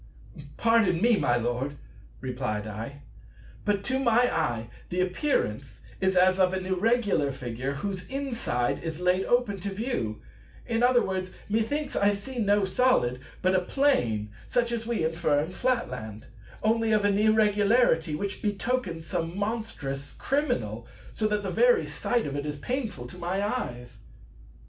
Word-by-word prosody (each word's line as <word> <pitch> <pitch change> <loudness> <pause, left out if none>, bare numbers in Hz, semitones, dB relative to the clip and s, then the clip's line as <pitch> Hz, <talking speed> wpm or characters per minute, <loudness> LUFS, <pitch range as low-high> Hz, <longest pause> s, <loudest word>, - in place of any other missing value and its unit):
"Pardon 225 -7 +3
me, 235 +4 +4
my 120 -11 +2
Lord," 120 +4 -2 0.4
replied 125 -5 -3
I; 115 +7 -7 0.6
"but 205 -1 +1
to 265 +3 0
my 245 -1 +3
eye 120 -8 -1 0.2
the 180 - -2
appearance 180 - -1 0.2
is 190 0 +1
as 185 +1 +5
of 185 0 +3
an 185 0 -3
Irregular 195 - +2
Figure 130 0 -4
whose 185 +4 -4
inside 235 - -1
is 160 -1 -4
laid 180 +1 +2
open 240 -5 +2
to 200 +3 -3
view; 195 - -2 0.5
in 230 -1 0
other 245 0 +5
words, 185 -1 -3
methinks 225 +8 -1
I 200 0 +3
see 240 +6 -6
no 205 -2 +3
Solid, 190 - +2 0.2
but 185 +1 +3
a 185 - +4
Plane 150 - +1 0.2
such 240 -1 +1
as 230 -1 -3
we 230 -9 0
infer 160 -3 +1
in 155 +4 -2
Flatland; 125 - -2 0.4
only 225 0 +2
of 210 -1 +3
an 200 0 +3
Irregularity 210 -5 +3
which 200 +5 -4
betokens 205 -5 -1
some 165 +2 -3
monstrous 205 -11 -3
criminal, 120 - -1 0.3
so 215 - 0
that 210 -1 -1
the 195 - -2
very 485 -2 +4
sight 240 -2 -1
of 140 - -4
it 145 +1 -3
is 150 0 -3
painful 230 - -3
to 175 +9 -10
my 180 +3 -1
eyes." 125 - -4
190 Hz, 155 wpm, -27 LUFS, 140-230 Hz, 0.6 s, as